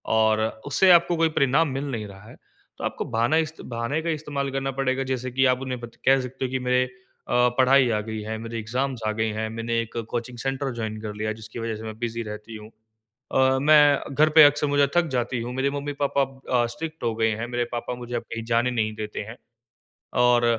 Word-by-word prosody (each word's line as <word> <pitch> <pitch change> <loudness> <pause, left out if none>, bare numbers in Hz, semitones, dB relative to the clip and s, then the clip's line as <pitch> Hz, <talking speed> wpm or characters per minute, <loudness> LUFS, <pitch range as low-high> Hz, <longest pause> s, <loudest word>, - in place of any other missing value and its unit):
और 110 -1 +3 0.3
उससे 180 +6 +4
आपको 170 0 +5
कोई 165 0 +3
परिणाम 150 +2 +2
मिल 135 +1 -3
नहीं 110 -4 -3
रहा 100 +2 -13
है। - - -13 0.4
तो - - -8
आपको - - -2
बहाना 120 +7 +1
इस्त 160 0 -2
बहाने 115 +6 -3
का 165 - -3
इस्तेमाल 145 -3 -2
करना 135 0 -2
पड़ेगा 130 0 +1
जैसे 130 0 -2
कि 130 +2 +2
आप 125 -1 +3
उन्हें 130 -2 -4
बत 120 -1 -10
कह 135 0 +5
सकते 130 +1 -4
हो 125 - -4
कि 130 - -1
मेरे 125 0 +2 0.4
अ, - - -3 0.2
पढ़ाई 130 0 +5
आ 110 -2 +1
गई 110 0 -5
है, 110 +1 -4
मेरे 115 +1 -6
एग्ज़ाम्स 125 +3 -2
आ 110 - +2
गए 110 0 +1
हैं, 110 +1 -3
मैंने 115 +1 -2
एक 115 +1 -8
कोचिंग 120 0 -4
सेंटर 135 +2 -2
जॉइन 110 -2 -4
कर 110 -1 -5
लिया 110 +1 -2
है, - - -1
जिसकी 110 +1 -9
वजह 115 -1 -3
से 110 - -9
मैं 110 -1 -7
बिज़ी 115 -1 -3
रहती 105 +1 -8
हूँ। 110 0 -10 0.6
अ, 130 0 +3
मैं 145 -2 +5
घर 155 +3 +4
पे 155 - +12
अक्सर 145 0 +4
मुझे 145 -1 +3
थक 175 -1 +3
जाती 120 0 -1
हूँ। 120 +2 -5
मेरे 135 +1 +1
मम्मी-पापा 140 -1 -1 0.4
अ, - - +1
स्ट्रिक्ट 160 0 -7
हो 115 -1 0
गए 110 0 +2
हैं, 120 - -3
मेरे 120 0 -1
पापा 120 +1 -3
मुझे 120 0 -4
कहीं 115 0 -4
जाने 120 +2 +2
नहीं 110 -3 -1
देते 105 -1 -5
हैं 120 - -9 0.9
और 120 -1 +4
125 Hz, 225 wpm, -25 LUFS, 115-140 Hz, 0.9 s, पे